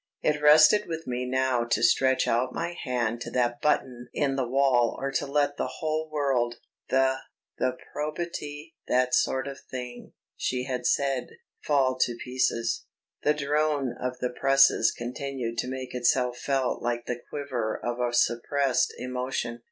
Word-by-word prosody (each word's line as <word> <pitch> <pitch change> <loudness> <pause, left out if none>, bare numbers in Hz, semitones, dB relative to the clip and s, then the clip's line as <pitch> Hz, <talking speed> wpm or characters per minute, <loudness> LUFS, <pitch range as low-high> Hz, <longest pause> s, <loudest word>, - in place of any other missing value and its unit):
It 150 -1 +1
rested 155 +8 +7
with 165 -1 -5
me 125 0 -2
now 130 -1 +1
to 120 - 0
stretch 130 0 +3
out 125 +2 +1
my 170 +1 -2
hand 120 -3 -1
to - - -5
that 120 -1 0
button 125 -5 0
in 140 -2 +1
the 130 -2 -1
wall 130 -2 +3
or 135 0 -2
to 135 - -1
let 145 0 +1
the - - -3
whole 155 0 -2
world 135 -6 0 0.3
"the... 130 0 +3 0.4
the 130 0 0 0.2
probity... 150 0 -5
that 125 0 +2
sort 130 +1 +2
of 140 -1 -7
thing," 125 -1 -7 0.2
she 125 0 -1
had 125 -2 -2
said 135 -3 +1 0.4
fall 130 -3 +2
to 120 -2 +2
pieces. 120 -2 -1 0.3
The 150 - +2
drone 150 -2 0
of 125 0 -2
the 125 0 -2
presses 135 +2 +4
continued 120 -1 -4
to - - -1
make 130 -1 -5
itself 125 0 +1
felt 135 -2 0
like 120 0 -2
the 120 -1 -4
quiver 125 -7 -3
of 120 0 -2
a 120 -1 0
suppressed 125 +3 +1
emotion. 125 -2 -3
130 Hz, 160 wpm, -27 LUFS, 125-140 Hz, 0.4 s, rested